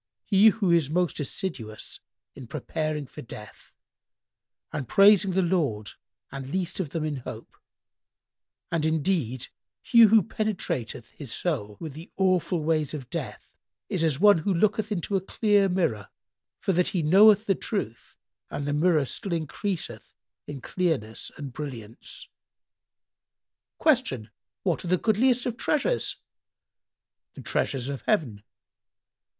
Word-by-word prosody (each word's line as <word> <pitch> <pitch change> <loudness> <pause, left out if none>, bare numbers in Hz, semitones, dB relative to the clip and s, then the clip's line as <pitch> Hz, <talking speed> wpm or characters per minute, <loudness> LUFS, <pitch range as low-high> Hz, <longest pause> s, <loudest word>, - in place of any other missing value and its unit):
"— - - -64
"He 200 +1 +5
who 205 -4 0
is 165 -5 +3
most 175 +1 0
assiduous 135 - -4 0.3
in 130 -3 -10
preparing 155 +2 -3
for - - -10
death 105 -3 -12 1.0
and 135 -5 -3
praising 200 - +6
the 190 +1 +2
Lord 145 - 0 0.4
and 135 -1 -6
least 185 +3 -2
of 175 -6 -2
them 160 +1 -3
in 150 -2 -2
hope, 120 -3 -9 1.2
and 165 -2 0
indeed 155 - 0 0.3
he 235 - +3
who 220 -2 +7
penetrateth 170 - -3
his 140 -6 -8
soul 105 - -2
with 160 -4 -6
the 160 +5 -11
awful 185 -3 +1
ways 155 -2 0
of 130 -5 -8
death - - -6 0.4
is 180 -4 0
as 150 -4 +1
one 205 -2 +6
who 180 +6 -1
looketh 210 +4 +1
into 200 0 -2
a 190 - +2
clear 205 0 +2
mirror, 165 - -1 0.5
for 195 - 0
that 180 +1 +2
he 175 -4 -1
knoweth 205 +6 +6
the 195 - +3
truth, 180 - -4 0.3
and 145 - -4
the 145 - -1
mirror 155 -1 +3
still 190 - -5
increaseth 170 +3 -4 0.3
in 145 -3 -7
clearness 155 - -2
and 140 -4 -7
brilliance." 120 -6 -8 1.5
Q 235 - +1 0.3
"What 180 -4 0
are - - -6
the 185 +1 +3
goodliest 235 +5 +2
of 240 -1 -2
treasures?"—"The 470 - -5
treasures 130 -2 -1
of 140 -1 -4
heaven." 140 - +1
165 Hz, 135 wpm, -26 LUFS, 140-195 Hz, 1.5 s, who